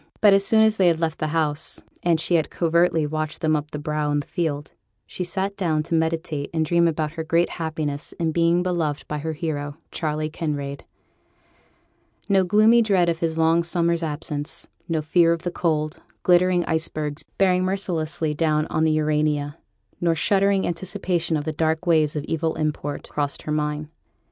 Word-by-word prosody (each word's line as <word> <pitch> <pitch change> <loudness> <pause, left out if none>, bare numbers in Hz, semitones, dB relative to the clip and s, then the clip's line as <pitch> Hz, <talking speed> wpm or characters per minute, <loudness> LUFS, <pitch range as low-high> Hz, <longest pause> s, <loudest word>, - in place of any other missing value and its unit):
But 205 -2 +6
as 195 0 +4
soon 220 +2 +4
as 220 0 +3
they 185 - +4
had 165 -2 +3
left 165 -1 -1
the 155 - 0
house, 155 -1 -1 0.2
and 170 -2 +2
she 175 - -1
had 165 -2 +2
covertly 170 -1 +2
watched 155 +1 -3
them 155 -1 +2
up 150 0 -3
the 150 - -5
brow 150 0 -2
in 145 0 +1
the - - -12
field, 150 -5 -3 0.3
she 180 - -5
sate 195 +2 -2
down 160 -6 0
to 165 - -5
meditate 160 -3 -1
and 160 -1 +2
dream 170 +1 +3
about 155 -2 -1
her 160 0 -5
great 165 +2 +2
happiness 155 -2 -3
in 165 -1 -1
being 170 +2 +2
beloved 165 -5 -1
by 150 - -3
her 160 +2 -3
hero, 145 -2 -4
Charley 155 -1 -2
Kinraid. 145 -3 -4 1.4
No 195 -1 +4
gloomy 215 +5 +5
dread 190 -6 +3
of 165 -1 -1
his 165 -1 -1
long 165 +1 +4
summer's 170 0 0
absence; 150 -2 -3 0.2
no 160 -2 0
fear 170 +2 +4
of 170 0 -5
the 175 - -2
cold, 155 -2 -1 0.3
glittering 180 0 +4
icebergs 155 -2 -2 0.2
bearing 185 -2 +3
mercilessly 170 -5 -1
down 155 0 +1
on 160 - +1
the 160 - +3
Urania, 150 -1 0 0.4
nor 170 -1 +2
shuddering 195 +3 +2
anticipation 175 -2 -1
of 145 - -3
the 155 +1 -3
dark 160 +2 0
waves 155 -3 +3
of 150 - -2
evil 160 +1 -1
import, 150 -2 -3
crossed 145 -1 -3
her 150 - -4
mind. 150 0 -1
160 Hz, 185 wpm, -23 LUFS, 150-175 Hz, 1.4 s, But